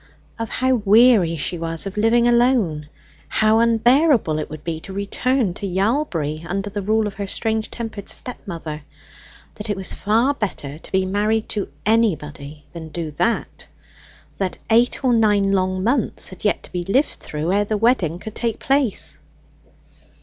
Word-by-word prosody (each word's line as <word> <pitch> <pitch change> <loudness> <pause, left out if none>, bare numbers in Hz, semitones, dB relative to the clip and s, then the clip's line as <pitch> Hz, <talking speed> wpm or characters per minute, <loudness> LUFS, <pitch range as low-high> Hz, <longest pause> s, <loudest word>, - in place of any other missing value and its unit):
Of 230 - -3
how 260 0 +1
weary 210 -5 +5
she 170 +3 -3
was 165 +1 -2
of 195 - -5
living 230 +3 +3
alone: 235 - +2 0.4
how 215 +1 +3
unbearable 235 - +3
it 155 - -4
would 155 -1 -9
be 165 -2 -3
to 190 - -10
return 205 +2 0
to 200 - -5
Yalbury 185 - -1
under 195 +4 -3
the 205 +1 -3
rule 215 +2 +1
of 205 - -4
her 200 0 -5
strange 220 +2 -1
tempered 220 -4 -6
step 250 - -2
mother; 160 -4 -6 0.7
that 210 +1 -7
it 205 - -1
was 190 - -3
far 230 +7 +2
better 155 - -5
to - - -13
be 190 -1 +2
married 210 +3 0
to 205 -2 -2 0.2
anybody 150 -9 0
than 165 -2 -8
do 160 -1 -5
that; 225 +10 -2 0.7
that 190 -2 -2
eight 235 +4 +3
or 250 - +4
nine 210 -3 +3
long 185 -1 0
months 240 +1 0
had 185 - -12
yet 210 - +1
to - - -10
be 180 - -2
lived 255 - +1
through 155 +4 -3
ere 205 +1 +3
the 215 +1 -1
wedding 205 -8 +2
could 215 +3 -8
take 230 -2 -2
place. 270 -6 0
205 Hz, 170 wpm, -21 LUFS, 175-230 Hz, 0.7 s, weary